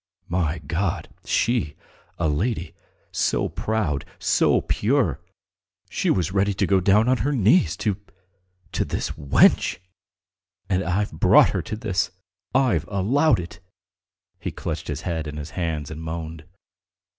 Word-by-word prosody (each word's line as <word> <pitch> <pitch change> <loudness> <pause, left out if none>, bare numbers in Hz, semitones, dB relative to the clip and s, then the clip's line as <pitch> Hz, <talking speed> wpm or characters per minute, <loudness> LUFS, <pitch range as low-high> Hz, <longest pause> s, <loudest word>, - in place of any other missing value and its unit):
"My 85 -2 0
God! 85 +5 -2 0.2
She, 110 -11 +1 0.4
a 85 - +1
lady, 85 +2 -1 0.4
so - - +1
proud, 105 -11 -1
so - - +3
pure.... 115 - +1 0.7
She - - 0
was 90 -1 +1
ready 100 +1 +1
to - - +1
go 95 -1 +3
down 105 +5 +4
on 130 0 +3
her 145 - 0
knees 105 - +3
to... 100 -3 +1 0.7
to - - 0
this - - -3
wench! 70 -3 +3 0.9
And 95 -1 +1
I've 95 +4 0
brought 80 - +5
her - - -1
to 110 - -5
this! 100 -5 -1 0.5
I've 115 - +2
allowed 110 - +2
it!" 85 -1 -8 0.8
He - - -3
clutched 80 -2 -5
his 75 0 -4
head 80 -4 -3
in 75 0 -6
his 75 +1 -6
hands 80 -6 -3
and 80 +1 -7
moaned. 80 -1 -6
90 Hz, 140 wpm, -24 LUFS, 80-105 Hz, 0.9 s, brought